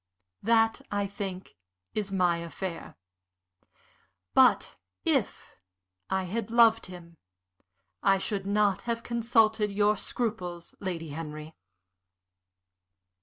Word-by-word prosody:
"That, 225 +1 +3
I 205 -1 -1
think, 195 -2 -6 0.4
is 205 -2 -2
my 180 -3 +2
affair. 170 +1 -6 1.4
But - - +4 0.3
if - - 0 0.6
I 190 0 0
had 205 +4 -3
loved 230 -2 +5
him 170 -2 -12 0.8
I 195 0 +4
should 195 0 -3
not 205 -1 +2
have 230 0 -1
consulted 225 -3 +2
your 205 +1 +3
scruples, 185 -8 -4
Lady 170 -4 -4
Henry." 155 +1 -7
200 Hz, 95 wpm, -28 LUFS, 180-220 Hz, 1.4 s, loved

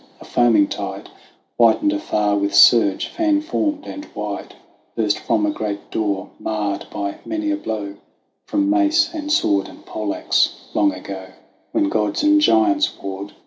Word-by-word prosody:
A - - -13
foaming 115 -5 +3
tide - - -6 0.5
Whitened 120 - +4
afar 105 - 0
with 100 0 -1
surge, 105 -5 +6
fan 315 -3 +1
formed 300 -1 -2
and 295 +1 -8
wide, - - -5 0.4
Burst - - 0
from 315 -1 0
a 310 - +1
great 100 - -5
door 100 -3 -2
marred 105 -2 -3
by 100 0 -4
many 315 -1 -2
a - - +1
blow 105 - -5 0.5
From 300 -1 +1
mace 325 +2 +3
and 300 -2 -4
sword 100 - +2
and - - -15
pole 105 -2 -3
axe, - - 0
long 100 -1 +3
ago 95 0 -8 0.4
When - - +1
gods 105 -1 0
and 305 0 +5
giants 325 -1 +3
warred. 100 +1 -6
115 Hz, 155 wpm, -20 LUFS, -, 0.5 s, surge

